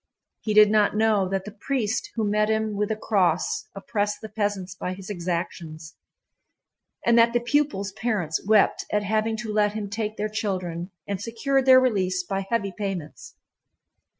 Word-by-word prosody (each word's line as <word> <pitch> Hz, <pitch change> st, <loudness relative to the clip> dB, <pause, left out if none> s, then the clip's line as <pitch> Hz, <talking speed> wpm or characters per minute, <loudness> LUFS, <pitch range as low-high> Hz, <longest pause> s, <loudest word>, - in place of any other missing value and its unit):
He 215 Hz, -1 st, -2 dB
did 210 Hz, -1 st, +7 dB
not 210 Hz, -1 st, +3 dB
know 210 Hz, -3 st, +2 dB
that 195 Hz, 0 st, -2 dB
the 210 Hz, -, -7 dB
priest 230 Hz, +1 st, -2 dB
who 225 Hz, -, 0 dB
met 210 Hz, +1 st, +1 dB
him 220 Hz, -1 st, 0 dB
with 210 Hz, 0 st, -1 dB
the 220 Hz, -, 0 dB
cross 185 Hz, -6 st, 0 dB
oppressed 205 Hz, +1 st, -2 dB
the 220 Hz, -, -8 dB
peasants 205 Hz, -3 st, -2 dB
by 185 Hz, -1 st, -4 dB
his 195 Hz, +2 st, -8 dB
exactions, 170 Hz, -3 st, -4 dB, 1.1 s
and 235 Hz, 0 st, +5 dB
that 230 Hz, 0 st, +5 dB
the 240 Hz, -, +3 dB
pupils' 240 Hz, -5 st, 0 dB
parents 200 Hz, -7 st, -2 dB
wept 215 Hz, -1 st, +4 dB
at 210 Hz, 0 st, +1 dB
having 220 Hz, +2 st, 0 dB
to 220 Hz, -1 st, -4 dB
let 210 Hz, -1 st, +2 dB
him 210 Hz, -2 st, -5 dB
take 215 Hz, 0 st, -3 dB
their 210 Hz, -, -1 dB
children 185 Hz, -5 st, -3 dB, 0.2 s
and 200 Hz, -1 st, -3 dB
secured 265 Hz, +5 st, 0 dB
their 260 Hz, 0 st, +9 dB
release 190 Hz, -7 st, +1 dB
by 195 Hz, +1 st, -3 dB
heavy 200 Hz, -5 st, -1 dB
payments. 195 Hz, -7 st, -5 dB
210 Hz, 170 wpm, -25 LUFS, 190-220 Hz, 1.1 s, their